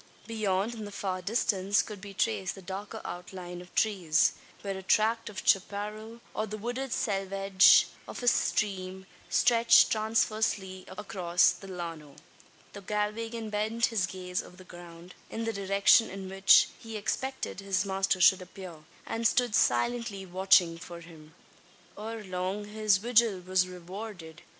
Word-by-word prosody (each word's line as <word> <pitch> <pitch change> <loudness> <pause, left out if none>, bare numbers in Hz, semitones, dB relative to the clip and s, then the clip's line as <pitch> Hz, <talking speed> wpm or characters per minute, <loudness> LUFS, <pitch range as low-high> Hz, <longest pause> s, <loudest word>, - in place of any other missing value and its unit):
Beyond, 215 -1 -1
in 220 -2 -7
the 205 - -8
far 190 -2 -3
distance, 200 -1 +1
could 210 -3 -9
be 200 0 -9
traced 100 - -1
the 195 - -11
darker 195 +3 -7
outline 180 0 -7
of 180 - -15
trees 185 -8 +2 0.3
where 195 -1 -3
a 190 - -6
tract 220 +4 +1
of 205 - -8
chapparal, 210 +4 -1
or 215 - -2
the 215 +1 -6
wooded 245 +4 -4
selvedge 195 -2 +4 0.2
of - - -7
a - - -2
stream 190 -5 0 0.2
stretched 235 -1 +5
transversely 215 -3 0
across 185 -3 +1
the 195 - -10
llano. 165 -6 -7 0.6
The 200 - -9
Galwegian 215 +2 -3
bent 220 +3 0
his 190 -5 +1
gaze 180 -1 -4
over 180 - -15
the 185 - -13
ground, 175 0 -12 0.2
in 225 0 -4
the 225 - -2
direction 200 +2 +4
in 195 0 -7
which 195 0 +5
he 225 -1 -7
expected 260 +2 -3
his 195 -1 -1
master 190 -1 0
should 185 +1 +6
appear; 180 -2 -10 0.3
and 230 0 0
stood 245 0 +1
silently 200 - +1
watching 185 -2 +3
for 170 0 -9
him. 160 -2 -15 0.6
Ere 220 +1 -6
long 185 +2 -3
his 210 -1 +2
vigil 230 -2 +2
was 185 0 +1
rewarded. 180 -2 -9
195 Hz, 150 wpm, -29 LUFS, 185-215 Hz, 0.6 s, should